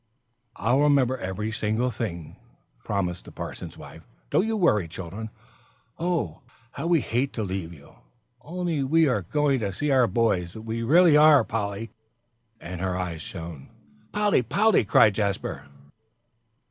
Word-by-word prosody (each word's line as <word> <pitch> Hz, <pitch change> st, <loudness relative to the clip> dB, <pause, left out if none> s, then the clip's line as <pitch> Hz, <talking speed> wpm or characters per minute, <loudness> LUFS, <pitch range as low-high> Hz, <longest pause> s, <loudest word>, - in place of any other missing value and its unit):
"I'll 120 Hz, +7 st, +1 dB
remember 140 Hz, -3 st, +3 dB
every 100 Hz, +3 st, -4 dB
single 110 Hz, +3 st, -1 dB
thing," 85 Hz, -9 st, -5 dB, 0.5 s
promised 90 Hz, -3 st, -2 dB
the -, -, -11 dB
parson's -, -, -8 dB
wife. -, -, -12 dB, 0.2 s
"Don't 205 Hz, -, +2 dB
you 225 Hz, -1 st, -1 dB
worry, 105 Hz, -, +2 dB
children. 95 Hz, +6 st, -7 dB, 0.7 s
Oh, 165 Hz, -, -2 dB, 0.3 s
how 140 Hz, +5 st, -5 dB
we 170 Hz, -3 st, +3 dB
hate 125 Hz, +4 st, -1 dB
to 110 Hz, -, -3 dB
leave 95 Hz, -3 st, -4 dB
you, 70 Hz, -4 st, -16 dB, 0.4 s
only 170 Hz, +1 st, -3 dB
we 160 Hz, +4 st, +3 dB
are 125 Hz, -7 st, +1 dB
going 140 Hz, -, +1 dB
to 100 Hz, -3 st, -2 dB
see 145 Hz, +10 st, -2 dB
our 130 Hz, -3 st, +4 dB
boys. 95 Hz, -5 st, 0 dB
We 110 Hz, +1 st, -4 dB
really 160 Hz, +6 st, +5 dB
are, 150 Hz, -1 st, +7 dB
Polly!" 105 Hz, 0 st, -4 dB, 0.7 s
And 90 Hz, 0 st, -7 dB
her 95 Hz, -1 st, -1 dB
eyes 85 Hz, -3 st, -4 dB
shone. 80 Hz, -6 st, -8 dB, 0.4 s
"Polly! 210 Hz, -7 st, +2 dB
Polly!" 200 Hz, -, +3 dB
called 105 Hz, +1 st, +5 dB
Jasper. 95 Hz, -9 st, -2 dB
110 Hz, 145 wpm, -25 LUFS, 95-145 Hz, 0.7 s, are